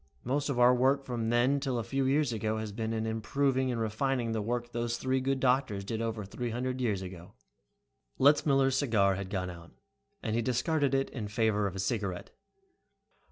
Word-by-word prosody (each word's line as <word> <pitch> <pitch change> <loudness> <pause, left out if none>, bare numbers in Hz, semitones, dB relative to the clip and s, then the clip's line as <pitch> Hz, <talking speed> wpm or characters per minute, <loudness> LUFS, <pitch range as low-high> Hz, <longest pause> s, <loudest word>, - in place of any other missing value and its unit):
Most 140 +4 -1
of 135 - -1
our 125 0 +6
work 135 +2 +2
from 115 -3 -2
then 125 +4 +3
till 135 -3 -2
a 115 - -1
few 135 +4 -1
years 140 -1 +2
ago 110 0 -1
has 110 -1 -4
been 110 +2 -3
in 110 0 -1
improving 130 +4 0
and 120 - -2
refining 115 +2 -1
the 110 -1 -1
work 120 +2 -3
those 120 0 -2
three 130 +1 0
good 135 +1 0
doctors 125 -6 +1
did 110 +3 -3
over 115 -2 -3
three 120 +5 -4
hundred 125 +2 -3
years 105 -6 0
ago." 90 +1 -9 0.8
Letzmiller's 135 -1 +4
cigar 110 -8 +3
had 95 0 -5
gone 90 -2 -2
out, 85 -1 -13 0.5
and 110 - -1
he 120 - +2
discarded 135 +4 +1
it 135 0 0
in 110 -6 -5
favor 105 -1 +1
of 95 - -6
a - - -5
cigarette. 95 -3 -2
120 Hz, 195 wpm, -30 LUFS, 110-130 Hz, 0.8 s, our